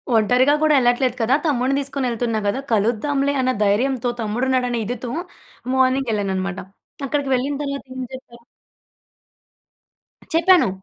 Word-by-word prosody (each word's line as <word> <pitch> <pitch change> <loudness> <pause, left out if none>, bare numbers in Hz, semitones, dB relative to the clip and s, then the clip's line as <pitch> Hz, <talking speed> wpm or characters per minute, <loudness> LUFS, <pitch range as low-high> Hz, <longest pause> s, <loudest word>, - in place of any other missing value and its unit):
ఒంటరిగా 250 +6 +4
కూడా 310 -1 +4
ఎళ్ళట్లేదు 245 0 +2
కదా! 235 +4 +3
తమ్ముడిని 270 -1 +1
తీసుకొని 275 -1 -3
వెళ్తున్నా 230 -1 -1
గదా 205 +6 0
కలుద్దాంలే 245 +6 +1
అన్న 255 0 +2
ధైర్యంతో 245 +4 +1
తమ్ముడున్నాడనే 245 +2 0
ఇదితో 240 +2 -4 0.6
మార్నింగ్ 260 -1 +2
ఎళ్ళానన్నమాట. 195 -2 -2 0.5
అక్కడికి 285 0 -1
వెళ్ళిన 270 +3 -1
తర్వాత 280 0 -4
ఏం 260 - -4
చెప్పారు? 235 -2 -12 1.9
చెప్పాను. 335 - +5
255 Hz, 115 wpm, -21 LUFS, 230-275 Hz, 1.9 s, చెప్పాను